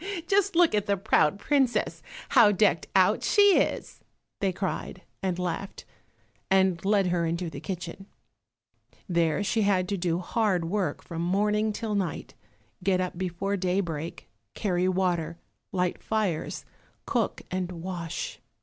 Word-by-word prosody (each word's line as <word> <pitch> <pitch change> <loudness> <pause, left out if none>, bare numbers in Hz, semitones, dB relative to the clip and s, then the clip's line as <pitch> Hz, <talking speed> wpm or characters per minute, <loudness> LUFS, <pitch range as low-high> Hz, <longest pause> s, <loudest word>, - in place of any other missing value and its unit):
"Just 395 0 +2
look 345 -5 +5
at 210 0 +1
the 200 0 +2
proud 190 -3 +3
princess, 265 +2 +1 0.3
how 235 -6 +6
decked 210 +1 +2
out - - +4
she 405 -2 +5
is!" - - -2 0.4
they 195 -2 +1
cried, 185 0 -4 0.2
and 185 -2 -1
laughed, 180 +2 -4 0.6
and 190 -3 +3
led 200 0 +3
her 170 -1 +1
into 170 0 -2
the - - -7
kitchen. 185 +1 -6 1.0
There 170 +1 +1
she 210 +3 +1
had 190 -3 +2
to 200 - -1
do 170 -2 0
hard 185 -1 0
work 195 +2 -2
from 165 -1 -5
morning 210 +4 +1
till 215 0 -3
night, 195 -5 -2 0.5
get 185 -1 +2
up 180 -1 -2
before 185 +2 -2
daybreak, 180 -4 -2 0.3
carry 185 -3 0
water, 175 -3 0 0.3
light 180 -1 -1
fires, 210 -8 -2 0.4
cook - - -1
and 185 -1 -2
wash. 170 -1 -5
185 Hz, 140 wpm, -27 LUFS, 175-205 Hz, 1.0 s, how